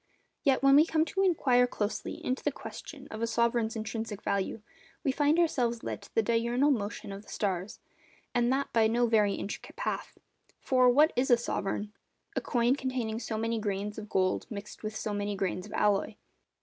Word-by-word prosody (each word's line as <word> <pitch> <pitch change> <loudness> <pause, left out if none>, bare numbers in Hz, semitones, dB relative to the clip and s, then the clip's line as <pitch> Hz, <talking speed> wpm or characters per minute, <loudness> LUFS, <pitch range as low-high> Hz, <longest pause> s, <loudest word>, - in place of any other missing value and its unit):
Yet, 270 -1 +3
when 275 0 +7
we 295 - +8
come 320 -1 +2
to 385 +4 -1
inquire 260 -10 +4
closely 210 -3 -3
into 255 +1 -1
the - - +1
question - - -9
of 220 - -6
a 230 - +1
sovereign's 235 -1 +1
intrinsic 220 -1 -4
value, 200 +2 -1 0.4
we 275 - +2
find 295 +3 +2
ourselves 245 -9 +1
led - - -4
to - - -16
the 225 - +4
diurnal 235 +5 +2
motion 205 -4 -3
of 195 0 -7
the 215 - -23
stars, 190 -1 -2 0.6
and 240 0 +2
that 275 +1 -1
by 225 -1 +5
no 240 +2 +2
very 210 -3 +3
intricate 200 - -6
path. - - -4 0.4
For, 255 -1 +4
What 295 +6 +5
is 250 +2 +1
a 240 - +7
sovereign? 210 -2 -3 0.4
A - - 0
coin 240 +1 +2
containing 255 -5 -2
so 225 -2 -3
many 225 +1 -1
grains 205 0 -3
of 210 -1 -9
gold 185 -1 +1
mixed 210 -2 -8
with 215 0 -5
so 215 -1 -3
many 205 0 -2
grains 190 0 -2
of - - -11
alloy. 205 +1 +1
230 Hz, 190 wpm, -30 LUFS, 210-255 Hz, 0.6 s, we